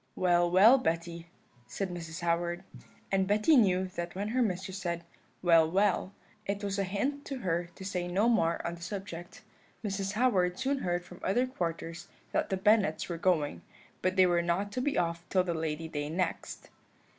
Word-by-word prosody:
"'Well, 175 -1 +3
well, 210 +9 +7
Betty,' 170 -5 -2 0.4
said 195 -2 -3
Mrs. 165 -1 -6
Howard, 170 +1 0 0.5
and 190 -1 +2
Betty 215 +10 +4
knew 190 -6 +4
that 175 -1 -5
when 200 +2 -2
her 255 +3 +1
mistress 190 -3 -2
said, 170 -2 -3 0.4
'Well, 165 -2 +5
well,' 190 +1 +1 0.4
it 200 +1 -2
was 200 0 -2
a - - +2
hint 265 +10 -2
to 275 - -4
her 175 -2 -1
to 190 - -9
say 180 -2 -2
no 195 +6 +2
more 170 -8 +2
on 170 - -2
the 170 - -11
subject. 175 -1 -7 0.4
Mrs. 195 0 -2
Howard 200 -7 +2
soon 270 +2 0
heard 175 -4 -1
from 180 +1 -12
other 245 +7 +2
quarters 170 -6 -4 0.2
that - - 0
the 190 - 0
Bennets 195 -5 +2
were 170 - -3
going, 155 - +1 0.4
but 185 0 0
they 185 -1 +6
were 175 -1 +3
not 175 +4 -1
to 250 - -2
be 285 +2 0
off 170 0 0
till 185 -1 +3
the 175 -2 -2
Lady 160 0 -3
Day 145 -2 -4
next. 175 +1 -3
180 Hz, 185 wpm, -30 LUFS, 170-200 Hz, 0.5 s, well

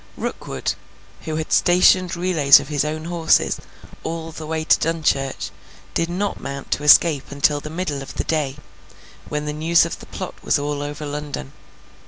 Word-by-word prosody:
Rookwood, - - -3 0.5
who 155 - -3
had 155 0 -2
stationed 180 0 +4
relays 170 -6 +5
of - - -8
his 145 -3 +1
own 155 +1 -4
horses 170 -1 +2 0.5
all 165 0 -4
the 155 -1 -8
way 160 0 -2
to - - +4
Dunchurch, 150 -5 -1 0.4
did 165 - 0
not 195 +4 -2
mount 140 0 -6
to 145 - 0
escape 150 -1 +5
until 145 +1 +2
the 150 - -8
middle 155 -4 -3
of 135 - -9
the - - -1
day, 150 -4 -1 0.7
when 150 0 -2
the 150 - -3
news 165 +3 +3
of 170 - -5
the - - -12
plot 185 - -6
was - - +2
all 145 0 -3
over 145 +1 -5
London. 145 - -5
155 Hz, 175 wpm, -21 LUFS, 145-165 Hz, 0.7 s, relays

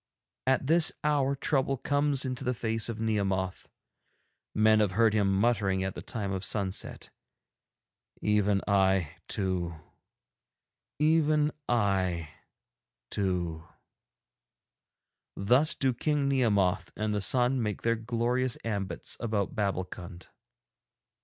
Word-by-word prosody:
At 130 0 +2
this 165 +3 +5
hour 140 -2 +2
trouble 135 -1 0
comes 145 +1 0
into 130 -1 -4
the 125 0 -1
face 110 0 0
of 115 -1 -5
Nehemoth. 95 -4 -1 0.9
Men 110 0 +5
have 105 -4 +1
heard 110 +1 +3
him 100 -2 +2
muttering 100 -4 +1
at 95 -1 -3
the - - -7
time 100 -4 -4
of 95 -1 -3
sunset: 100 -2 -2 1.1
"Even 105 -1 +1
I 95 -5 +2
too, 90 -4 -2 1.2
even 155 -1 +3 0.2
I 95 -8 +1 0.8
too." 85 -5 -2 1.7
Thus 125 +10 +2
do 130 -2 +1
King 145 +3 0
Nehemoth 105 -9 +1
and 110 0 -1
the 105 - -1
sun 125 +4 +2
make 105 -3 -3
their 115 0 +2
glorious 120 +2 -1
ambits 100 -4 -3
about 110 -4 -1
Babbulkund. 90 -3 -4
110 Hz, 110 wpm, -29 LUFS, 95-130 Hz, 1.7 s, this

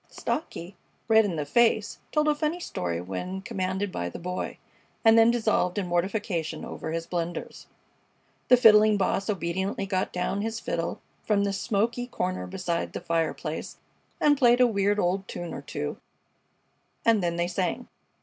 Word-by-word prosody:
Stocky, 190 - -4 0.3
red 220 -1 +6
in 185 -5 -2
the 150 -2 -2
face, 220 +4 +2
told 300 0 +2
a 300 - +5
funny 305 +3 -1
story 85 - -3
when 95 - -5
commanded 190 -3 -2
by 85 - -3
the - - -8
Boy, 180 +1 -4 0.5
and 225 0 +8
then 225 0 +7
dissolved 220 -5 +1
in 200 - 0
mortification 175 -2 -1
over 160 - -6
his 165 0 -3
blunders. 175 0 -4 0.8
The 250 - +7
Fiddling 215 -2 +7
Boss 195 +1 0
obediently 190 +1 -1
got 190 -1 -1
down 190 +2 -1
his 225 +1 -3
fiddle 170 -6 -3 0.2
from 205 -2 +1
the 200 -1 0
smoky 230 +4 -1
corner 185 -6 -3
beside 180 -2 -3
the - - -3
fireplace 165 -2 -2 0.4
and 290 -2 +4
played 245 -2 +5
a 250 - +7
weird 205 -3 +1
old 190 +1 0
tune 175 -1 -6
or - - -6
two, 75 - -4 1.1
and 225 -3 +4
then 170 -1 0
they 170 0 0
sang. 185 +7 -2
195 Hz, 160 wpm, -27 LUFS, 175-225 Hz, 1.1 s, and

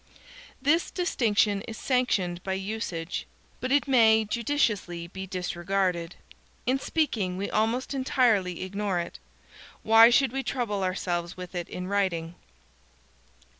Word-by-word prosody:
This 295 +6 +2
distinction 220 - +1
is 225 -1 -6
sanctioned 195 -9 0
by 190 - -3
usage. 190 -4 -4 0.3
But 255 - -3
it 285 +1 +3
may 220 -4 +5
judiciously 210 - -1
be 190 +2 -8
disregarded. 180 -1 -2 0.5
In 260 +3 +1
speaking 220 - -1
we 200 +1 -3
almost 230 +6 0
entirely 230 -10 +1
ignore 200 0 -2
it. 170 - -6 0.6
Why 225 +1 +8
should 265 +1 +3
we 270 +1 -2
trouble 230 -7 -2
ourselves 175 -2 -2
with 180 0 -8
it 175 -2 -4
in 180 - -5
writing? 185 -4 -1
205 Hz, 125 wpm, -27 LUFS, 180-245 Hz, 0.6 s, Why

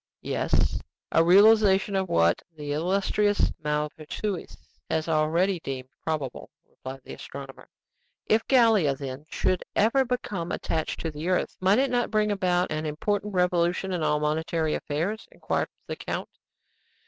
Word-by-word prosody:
"Yes; - - 0 0.3
a 165 - +5
realization 200 +1 +5
of 190 -2 0
what 85 +1 +3 0.2
the 145 -1 -5
illustrious 195 +5 +1
Maupertuis 150 +6 -3 0.3
has 160 0 0
already 165 +4 +2
deemed 130 -4 -6
probable," 150 -6 -3 0.2
replied 135 +1 -9
the - - -9
astronomer. 135 -1 -10 0.6
"If 220 +1 +2
Gallia, 225 - +4
then, 135 +2 -7
should 185 - 0
ever 235 +6 +4
become 205 -9 -3
attached 160 -1 -2
to 165 - -3
the 155 +4 -4
earth, 185 - 0
might 190 +3 +4
it 270 +1 +2
not 245 -1 +1
bring 215 -1 +1
about 180 -3 +1
an 155 0 -2
important 205 +6 -2
revolution 180 +1 +1
in 175 - -1
all 150 -1 +2
monetary 155 +1 0
affairs?" 170 +9 -2
inquired - - -2 0.2
the - - -4
count. - - -4
175 Hz, 140 wpm, -26 LUFS, 150-205 Hz, 0.6 s, a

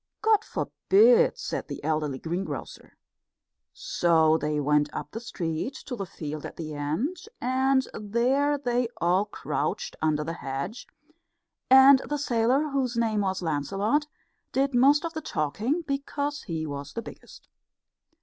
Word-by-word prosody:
"God 435 -1 +4
forbid!" 475 +4 +3
said - - -4
the - - -7
elderly 155 -3 -1
greengrocer. 175 +6 -6 0.7
So 160 -2 +2
they 150 -1 -1
went 150 0 +2
up - - -6
the 225 - -5
street 180 - -4
to 250 - -4
the 195 -4 -5
field 155 -2 -6
at - - -7
the 155 -2 -5
end, 155 - -2 0.2
and 260 +1 +2
there 255 +7 +1
they 245 -3 0
all 180 +4 +2
crouched 485 - -3
under 155 -1 +1
the 165 +2 -4
hedge; 140 - -5 0.8
and 265 +1 +8
the 295 - 0
sailor, 260 +2 +1
whose 260 -4 -1
name 220 -2 +1
was 190 -2 -1
Lancelot, 195 - 0 0.4
did 275 +1 +1
most 280 +6 +5
of 330 - -4
the 315 - -4
talking, 230 - -1
because 285 0 -3
he 160 -3 -4
was 145 -1 -6
the 230 - -4
biggest. - - -13
230 Hz, 140 wpm, -27 LUFS, -, 0.8 s, and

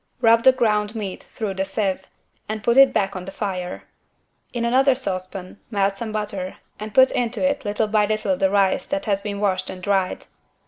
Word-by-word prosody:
Rub 230 -1 +5
the 260 - +8
ground 215 -4 0
meat 200 -4 -6
through 210 -3 -2
the 190 0 -1
sieve 195 0 -2 0.4
and 215 -1 -4
put 235 - +2
it 270 0 +8
back 195 0 0
on 185 -1 -5
the 195 - -7
fire. 185 -3 -4 0.7
In 235 -1 -2
another 260 +3 +4
saucepan 185 -4 -5
melt 200 -3 +1
some 220 +2 -5
butter 200 -3 -4 0.2
and 215 0 -6
put 260 +3 +6
into 245 +3 0
it 280 -3 -2
little 210 +1 0
by 210 -1 +2
little 215 -3 0
the 190 +1 +2
rice 200 +5 +2
that 290 0 -2
has 200 -2 0
been 200 -1 -4
washed 185 -2 0
and 185 - -7
dried. 195 -2 0
210 Hz, 195 wpm, -22 LUFS, 195-230 Hz, 0.7 s, the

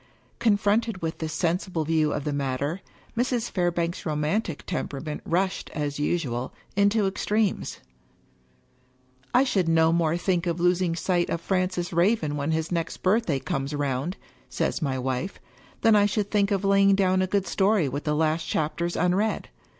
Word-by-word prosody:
Confronted 210 -1 +1
with 165 0 -3
this 160 -1 -3
sensible 170 0 -1
view 155 -1 +2
of 145 - -2
the 150 - -2
matter, 140 +5 -2 0.3
Mrs. 240 -1 0
Fairbank's 175 -1 -1
romantic 155 +3 -1
temperament 150 +2 -4
rushed, 185 +3 0
as 145 -2 -2
usual, 140 -6 -1 0.2
into 200 +1 +3
ex 190 0 -2
tremes. 210 -2 0 0.8
" 125 - -36
I 255 - +6
should 190 -10 +1
no 165 0 +4
more 165 -1 +2
think 180 -1 0
of 170 0 -1
losing 175 -1 +2
sight 175 0 0
of 170 - -1
Francis 185 -1 -1
Raven 170 -3 +2
when 145 +1 -2
his 160 +1 -1
next 165 -1 -3
birthday 185 -6 +2
comes 135 +2 -3
round," 145 +4 -2 0.3
says - - -1
my 135 -4 -1
wife, 130 +8 -3 0.2
" - - -27
than 225 -1 +5
I 205 0 +5
should 205 0 -2
think 200 -2 +2
of 200 -1 0
laying 195 0 +5
down 185 -1 +2
a 185 - +1
good 200 0 0
story 195 -4 +2
with 140 +3 -4
the 150 -2 0
last 160 +1 +1
chapters 170 +3 -1
unread. 190 +5 0
170 Hz, 165 wpm, -26 LUFS, 150-195 Hz, 0.8 s, I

